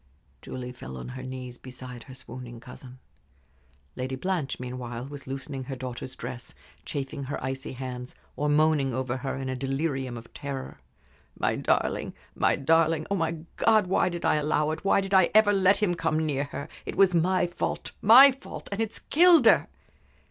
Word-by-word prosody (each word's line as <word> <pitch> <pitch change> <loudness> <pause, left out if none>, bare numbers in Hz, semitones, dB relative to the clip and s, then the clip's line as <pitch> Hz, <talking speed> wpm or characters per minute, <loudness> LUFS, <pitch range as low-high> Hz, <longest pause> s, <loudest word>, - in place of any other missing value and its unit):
Julie 125 -1 -6
fell 65 - -9
on 65 - -7
her 130 +1 -7
knees 130 -1 -7
beside 125 -2 -10
her 130 - -11
swooning 125 -2 -9
cousin. 125 +1 -12 1.0
Lady 130 +1 -3
Blanche, 170 -1 -2
meanwhile, 125 -1 -5
was 140 -1 -9
loosening 135 0 -5
her 135 - -5
daughter's 130 0 -6
dress, 120 0 -7 0.3
chafing 140 -1 -4
her 140 - -3
icy 130 0 -4
hands, 125 -1 -7 0.2
or 150 +3 0
moaning 145 -4 +3
over 130 -1 -2
her 135 +1 -3
in 135 0 -4
a 130 - -2
delirium 135 -1 -2
of 115 0 -12
terror. 140 -2 -6 0.6
"My - - +1
darling - - 0 0.2
my - - +2
darling! 160 +2 +2
Oh, - - +3
my 165 -3 -1 0.2
God! 220 -3 +4
Why 185 0 +2
did 175 -1 -5
I - - +3
allow 150 0 +1
it? 160 - -5
Why 195 0 +3
did 195 0 -5
I 190 -2 +6
ever 215 -1 +6
let 195 0 +4
him 205 -4 +1
come 160 -2 0
near 140 -2 -1
her? 140 +1 -6 0.2
It - - -6
was 195 -2 +5
my 180 +2 +3
fault 175 - -3
my 255 +7 +9
fault! 270 +2 -10
And 200 +2 -2
it's 225 0 -3
killed 335 -4 +5
her!" 220 - +6
140 Hz, 180 wpm, -27 LUFS, 130-170 Hz, 1.0 s, my